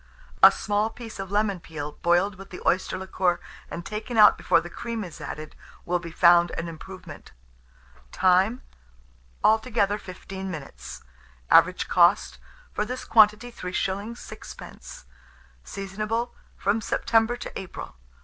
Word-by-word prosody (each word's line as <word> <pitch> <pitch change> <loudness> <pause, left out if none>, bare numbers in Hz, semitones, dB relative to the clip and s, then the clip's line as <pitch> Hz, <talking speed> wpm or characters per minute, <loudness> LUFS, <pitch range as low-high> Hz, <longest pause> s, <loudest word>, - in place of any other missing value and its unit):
A - - +10
small 210 +1 0
piece 225 -2 -10
of 195 -1 -5
lemon 205 -2 0
peel 150 -3 -6
boiled 175 +4 +3
with 195 +1 -12
the 180 - -8
oyster 185 0 +1
liquor, 185 -2 0 0.3
and 170 - -6
taken 220 +3 -5
out 210 - +8
before - - +3
the 170 - -7
cream 230 +5 -5
is 175 -4 -10
added, 155 0 -7 0.3
will 175 +1 0
be 170 -1 -8
found 175 +1 +5
an 170 - -3
improvement. 185 +3 -10 0.8
Time. 190 +7 +3 0.8
Altogether 220 -2 +2
15 190 0 -8
minutes. 155 -6 -8 0.5
Average - - +5
cost - - +3 0.3
for - - 0
this 250 +4 -5
quantity, 220 +2 +4
3s. 195 +3 -3
6d. - - -10 0.6
Seasonable 215 +4 -3 0.2
from 210 +3 0
September 225 +2 +1
to - - -7
April. 185 - -8
195 Hz, 130 wpm, -25 LUFS, 180-220 Hz, 0.8 s, A